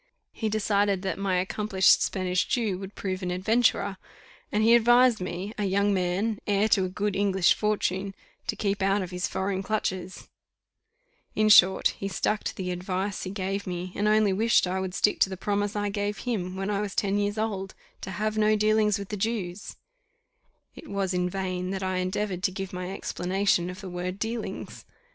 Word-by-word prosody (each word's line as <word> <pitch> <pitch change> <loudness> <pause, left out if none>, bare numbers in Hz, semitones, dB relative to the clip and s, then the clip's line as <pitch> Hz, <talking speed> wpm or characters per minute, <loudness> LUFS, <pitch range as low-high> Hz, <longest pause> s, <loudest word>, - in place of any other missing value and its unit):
He 220 - -3
decided 205 -2 +1
that 190 -1 -2
my 195 -2 0
accomplished 190 +1 +3
Spanish 185 -1 0
Jew 215 -7 0
would 195 0 -8
prove 190 -1 -3
an 180 - -3
adventurer, 200 +1 +1 0.5
and 210 +1 +1
he 230 +1 +6
advised 240 -1 +5
me, 185 +3 -4
a 205 - 0
young 200 +1 +2
man, 195 +4 0
heir 205 +1 +2
to 190 -3 +3
a - - -3
good 200 +1 -2
English 195 -2 +3
fortune, 200 -2 -1 0.3
to - - -1
keep 200 -1 -1
out 195 +1 +2
of 180 - -7
his 180 0 -2
foreign 190 0 -2
clutches: 190 -3 -3 1.1
in 215 0 +3
short, 190 -2 +7
he 195 - -5
stuck 210 +2 -1
to - - -3
the 180 -1 -3
advice 185 +2 -3
he 185 - -4
gave 195 +1 -3
me, 180 0 -4
and 205 - 0
only 215 -2 +4
wished 225 +3 +3
I 185 +1 -2
would 190 -1 -4
stick 210 - +2
to - - +4
the 190 - -5
promise 205 +1 -1
I 205 0 -1
gave 205 0 -2
him, 190 -7 -3
when 195 +2 -2
I 200 0 0
was 205 -2 -4
ten 200 0 +1
years 205 +1 -1
old, 200 -3 -3 0.3
to - - -6
have 215 +2 -2
no 215 0 +4
dealings 215 0 +3
with 200 -1 -7
the 210 - -3
Jews. 200 -3 -3 1.0
It - - -11
was 195 -2 -2
in 180 0 0
vain 185 -1 -3
that 195 0 -3
I 185 0 -1
endeavoured 185 0 -2
to 190 - +1
give 190 0 -6
my 180 0 -4
explanation 190 -1 0
of 180 +3 -8
the 195 - -7
word 180 +1 -4
dealings. 225 +2 -5
195 Hz, 195 wpm, -27 LUFS, 185-210 Hz, 1.1 s, short